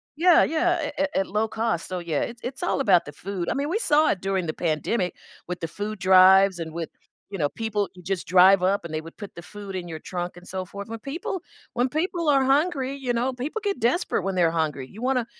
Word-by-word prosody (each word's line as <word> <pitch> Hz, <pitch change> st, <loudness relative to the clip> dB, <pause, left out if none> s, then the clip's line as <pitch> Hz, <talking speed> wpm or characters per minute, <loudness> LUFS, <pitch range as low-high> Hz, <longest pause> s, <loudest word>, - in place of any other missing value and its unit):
Yeah, 345 Hz, +2 st, +6 dB
yeah, 325 Hz, 0 st, 0 dB
at -, -, -5 dB
at 290 Hz, 0 st, +2 dB
at 190 Hz, -, +1 dB
low 215 Hz, +2 st, 0 dB
cost, 220 Hz, -7 st, -1 dB
so 185 Hz, -, -3 dB
yeah, 170 Hz, -4 st, -2 dB
it's 240 Hz, 0 st, -4 dB
it's 260 Hz, +1 st, -5 dB
all -, -, 0 dB
about 195 Hz, -10 st, +4 dB
the 145 Hz, -, -8 dB
food. 180 Hz, +3 st, -5 dB
I -, -, +1 dB
mean, 280 Hz, +1 st, -1 dB
we 415 Hz, +7 st, 0 dB
saw 305 Hz, -6 st, +3 dB
it 185 Hz, -, -3 dB
during 190 Hz, -2 st, -1 dB
the 155 Hz, -, -2 dB
pandemic 180 Hz, +4 st, -1 dB, 0.3 s
with 180 Hz, -, -3 dB
the 165 Hz, -, -3 dB
food 205 Hz, +4 st, -5 dB
drives 190 Hz, 0 st, +6 dB
and 160 Hz, -1 st, -5 dB
with, 165 Hz, 0 st, -5 dB, 0.4 s
you 195 Hz, -, -4 dB
know, 145 Hz, -2 st, +1 dB
people 210 Hz, -1 st, -2 dB
you 180 Hz, -, -13 dB
just 190 Hz, 0 st, -3 dB
drive 185 Hz, +1 st, +6 dB
up 190 Hz, -1 st, +1 dB
and 160 Hz, -, -7 dB
they 155 Hz, -, -2 dB
would 165 Hz, +1 st, -13 dB
put 205 Hz, -2 st, -9 dB
the 170 Hz, -, -8 dB
food 200 Hz, +2 st, -9 dB
in 175 Hz, -2 st, -4 dB
your 160 Hz, -1 st, -6 dB
trunk 175 Hz, -1 st, -4 dB
and 175 Hz, -, -13 dB
so 185 Hz, 0 st, -4 dB
forth, 200 Hz, +3 st, -8 dB
when 225 Hz, 0 st, -6 dB
people 330 Hz, -, -4 dB, 0.3 s
when 245 Hz, +1 st, +1 dB
people 330 Hz, +2 st, -1 dB
are 275 Hz, -2 st, +4 dB
hungry, 275 Hz, -1 st, +1 dB
you 265 Hz, -3 st, -3 dB
know, 245 Hz, +2 st, 0 dB
people 270 Hz, -, -4 dB
get 400 Hz, -2 st, -1 dB
desperate 240 Hz, -, +1 dB
when 195 Hz, -1 st, -2 dB
they're 170 Hz, -2 st, +3 dB
hungry, 145 Hz, -4 st, -3 dB
you 215 Hz, -, -12 dB
wanna 255 Hz, -2 st, +1 dB
200 Hz, 250 wpm, -25 LUFS, 180-265 Hz, 0.4 s, Yeah